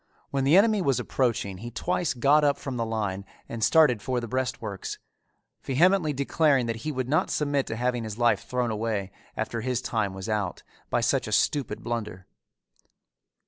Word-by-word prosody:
When 135 -1 0
the 150 +6 +6
enemy 215 0 +4
was 135 -7 +1
approaching 110 -7 -1
he 120 - -6
twice 170 +5 -1
got 140 +5 +4
up 145 -1 +3
from 135 -2 -5
the 115 -2 -1
line 105 -4 -2 0.2
and 115 -1 -4
started 150 -8 +5
for 125 +1 -1
the 120 - -5
breastworks, 115 -5 -3 0.6
vehemently 165 +4 +3
declaring 140 -1 +2
that 115 -1 -2
he 155 +7 -4
would 130 -3 -3
not 150 +4 +1
submit 145 -2 0
to 110 - -3
having 125 0 -1
his 110 -1 -6
life 120 -1 +2
thrown 125 0 -1
away, 105 -3 -2 0.3
after 110 +1 -2
his 125 0 -1
time 110 -6 -2
was 95 0 -6
out, 105 -4 -2 0.3
by - - +1
such - - +1
a - - -5
stupid 130 -7 0
blunder. 110 -6 -4
120 Hz, 180 wpm, -26 LUFS, 110-140 Hz, 0.6 s, the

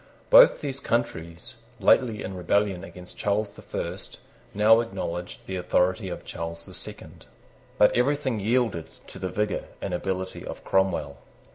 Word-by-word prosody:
Both - - +8
those 140 -2 -4
countries, 90 -11 -3 0.3
lately 115 -5 +3
in 95 - -5
rebellion 95 0 +1
against 90 -2 -11
Charles 105 0 0
the - - -14
First, - - -5 0.3
now 110 +2 +5
acknowledged 90 -6 -4
the 95 - -4
authority 90 +2 +1
of 85 - -7
Charles 85 0 -5
the - - -12
Second. - - -7 0.5
But 105 - +5
everything 130 -2 +1
yielded 110 -5 +1 0.2
to - - -10
the 95 0 -3
vigour 105 +1 -1
and 95 - -4
ability 95 +1 -3
of - - -8
Cromwell. 95 -7 +1
100 Hz, 145 wpm, -26 LUFS, 90-115 Hz, 0.5 s, Both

